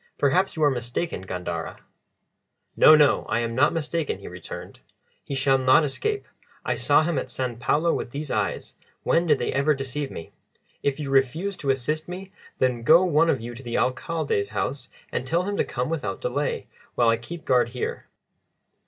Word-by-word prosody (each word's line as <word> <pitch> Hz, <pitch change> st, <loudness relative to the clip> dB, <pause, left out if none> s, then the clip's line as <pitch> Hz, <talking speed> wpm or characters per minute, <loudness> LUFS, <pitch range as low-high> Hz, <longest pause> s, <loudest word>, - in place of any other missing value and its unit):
Perhaps 180 Hz, +8 st, +2 dB
you 155 Hz, -, 0 dB
are 145 Hz, -, +5 dB
mistaken, 120 Hz, -, -3 dB
Gandara." 90 Hz, -1 st, -4 dB, 1.0 s
"No, 155 Hz, -, +8 dB
no, 150 Hz, -2 st, +4 dB
I 120 Hz, -, +1 dB
am 115 Hz, 0 st, -2 dB
not 135 Hz, +5 st, +4 dB
mistaken," 165 Hz, -1 st, -2 dB
he -, -, -11 dB
returned. -, -, -9 dB, 0.4 s
"He 140 Hz, -, -5 dB
shall 135 Hz, 0 st, +3 dB
not 130 Hz, +4 st, +5 dB
escape. 415 Hz, -, -2 dB, 0.4 s
I -, -, +1 dB
saw -, -, +3 dB
him 160 Hz, -3 st, 0 dB
at -, -, -6 dB
San 125 Hz, -1 st, -3 dB
Paulo 160 Hz, +7 st, +2 dB
with -, -, -3 dB
these 145 Hz, +3 st, -5 dB
eyes -, -, -2 dB, 0.3 s
when 170 Hz, +1 st, +2 dB
did 150 Hz, -3 st, +4 dB
they -, -, -2 dB
ever 145 Hz, +2 st, +2 dB
deceive 135 Hz, +1 st, -3 dB
me? 80 Hz, -, -9 dB, 0.5 s
If 140 Hz, +1 st, -1 dB
you 140 Hz, -2 st, -4 dB
refuse 145 Hz, +9 st, +1 dB
to 140 Hz, -, -4 dB
assist 150 Hz, +4 st, 0 dB
me, 185 Hz, +2 st, -7 dB, 0.3 s
then 125 Hz, -2 st, +1 dB
go 160 Hz, +9 st, +6 dB
one 165 Hz, -2 st, +3 dB
of 135 Hz, -, +1 dB
you 120 Hz, +1 st, -6 dB
to 120 Hz, -, -10 dB
the 120 Hz, -2 st, -3 dB
Alcalde's 130 Hz, -4 st, -1 dB
house 130 Hz, +5 st, -3 dB, 0.2 s
and 130 Hz, -, -3 dB
tell 170 Hz, +5 st, +1 dB
him 200 Hz, +2 st, -2 dB
to -, -, +3 dB
come 125 Hz, 0 st, -3 dB
without 120 Hz, -12 st, -3 dB
delay, 140 Hz, +4 st, -2 dB, 0.3 s
while 120 Hz, -2 st, +4 dB
I 115 Hz, -, +3 dB
keep 160 Hz, +9 st, -9 dB
guard 125 Hz, -2 st, +3 dB
here." 125 Hz, +1 st, -4 dB
140 Hz, 190 wpm, -25 LUFS, 125-160 Hz, 1.0 s, No